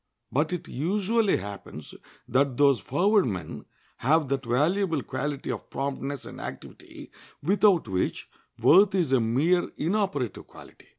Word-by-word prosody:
But 150 Hz, +7 st, 0 dB
it 180 Hz, -, -4 dB
usually 200 Hz, -, +1 dB
happens 100 Hz, -7 st, -9 dB, 0.3 s
that 135 Hz, -1 st, +1 dB
those 140 Hz, -3 st, +4 dB
forward 195 Hz, -, +2 dB
men 90 Hz, -7 st, -5 dB, 0.3 s
have 150 Hz, +2 st, +2 dB
that 135 Hz, -2 st, -2 dB
valuable 160 Hz, -, +1 dB
quality 140 Hz, +1 st, -4 dB
of -, -, -7 dB
promptness 140 Hz, 0 st, -4 dB
and -, -, -9 dB
activity, -, -, -10 dB, 0.3 s
without 190 Hz, -, +3 dB
which 95 Hz, -2 st, -2 dB, 0.3 s
worth 195 Hz, +4 st, +5 dB
is 170 Hz, -8 st, +1 dB
a 130 Hz, -, +4 dB
mere 150 Hz, +11 st, +1 dB
inoperative 175 Hz, -, -2 dB
quality. -, -, -16 dB
145 Hz, 130 wpm, -26 LUFS, 130-185 Hz, 0.3 s, worth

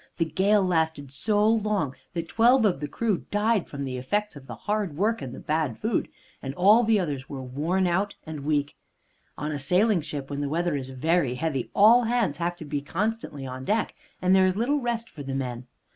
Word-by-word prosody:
The 165 Hz, -, +2 dB
gale 195 Hz, +4 st, +2 dB
lasted 160 Hz, -6 st, 0 dB
so 210 Hz, +9 st, +2 dB
long 210 Hz, -, +1 dB, 0.2 s
that 165 Hz, -1 st, -3 dB
twelve 235 Hz, +3 st, +4 dB
of 185 Hz, -9 st, +2 dB
the 150 Hz, -, -3 dB
crew 210 Hz, +3 st, -2 dB
died 210 Hz, -1 st, +1 dB
from 140 Hz, -1 st, -6 dB
the 130 Hz, -2 st, -4 dB
effects 205 Hz, +10 st, -2 dB
of 135 Hz, -2 st, -12 dB
the -, -, -7 dB
hard 205 Hz, -7 st, -2 dB
work 220 Hz, +5 st, +1 dB
and 130 Hz, -, -5 dB
the -, -, -8 dB
bad 155 Hz, -6 st, -1 dB
food, 220 Hz, -1 st, -1 dB, 0.3 s
and 135 Hz, 0 st, -5 dB
all 210 Hz, +8 st, +6 dB
the 220 Hz, -2 st, +3 dB
others 140 Hz, -7 st, -3 dB
were 135 Hz, -2 st, -6 dB
worn 155 Hz, +9 st, 0 dB
out 190 Hz, +3 st, 0 dB
and 160 Hz, -2 st, -6 dB
weak. 145 Hz, 0 st, -1 dB, 0.6 s
On 150 Hz, +2 st, -3 dB
a 145 Hz, -, -3 dB
sailing 180 Hz, +7 st, +2 dB
ship, 145 Hz, -2 st, -6 dB
when 140 Hz, 0 st, -3 dB
the 145 Hz, -, -2 dB
weather 170 Hz, +1 st, 0 dB
is 135 Hz, -2 st, -4 dB
very 135 Hz, 0 st, +1 dB
heavy, 135 Hz, -3 st, -2 dB
all 230 Hz, +4 st, +7 dB
hands 225 Hz, -11 st, +1 dB
have 175 Hz, +1 st, -1 dB
to 165 Hz, -, -9 dB
be 145 Hz, -1 st, -3 dB
constantly 185 Hz, -3 st, -3 dB
on 130 Hz, 0 st, -6 dB
deck, 215 Hz, +10 st, 0 dB, 0.3 s
and 185 Hz, +1 st, +5 dB
there 190 Hz, 0 st, +5 dB
is 185 Hz, +1 st, 0 dB
little 275 Hz, +6 st, +1 dB
rest 235 Hz, -2 st, -2 dB
for 150 Hz, -, -11 dB
the 135 Hz, -1 st, -4 dB
men. 125 Hz, -2 st, -4 dB
170 Hz, 215 wpm, -26 LUFS, 140-210 Hz, 0.6 s, all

